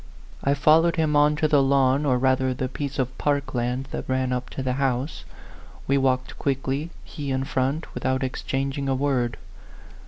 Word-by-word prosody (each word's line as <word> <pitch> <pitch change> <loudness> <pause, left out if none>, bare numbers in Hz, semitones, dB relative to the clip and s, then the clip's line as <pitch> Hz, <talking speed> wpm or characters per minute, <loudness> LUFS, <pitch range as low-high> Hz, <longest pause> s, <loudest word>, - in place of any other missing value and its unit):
I 140 +1 +2
followed 160 +4 +4
him 155 -2 +1
on 150 +1 +4
to 155 +1 +1
the 145 -2 +4
lawn, 135 +1 +3
or 130 -2 +3
rather 130 0 +1
the 130 0 -2
piece 140 +1 -5
of 130 -1 -1
park 145 -1 0
land 125 +2 -1
that - - -5
ran 130 -1 0
up 125 0 -3
to 135 - -5
the 130 -1 0
house. 135 +2 -1 0.6
We 140 0 +2
walked 130 -1 0
quickly, 135 +3 -1
he 145 -3 -6
in 130 0 0
front, 135 +3 -2
without 130 +1 -1
ex 130 - -3
changing 135 +1 -2
a 135 - +2
word. 130 -3 0
135 Hz, 185 wpm, -24 LUFS, 130-145 Hz, 0.6 s, followed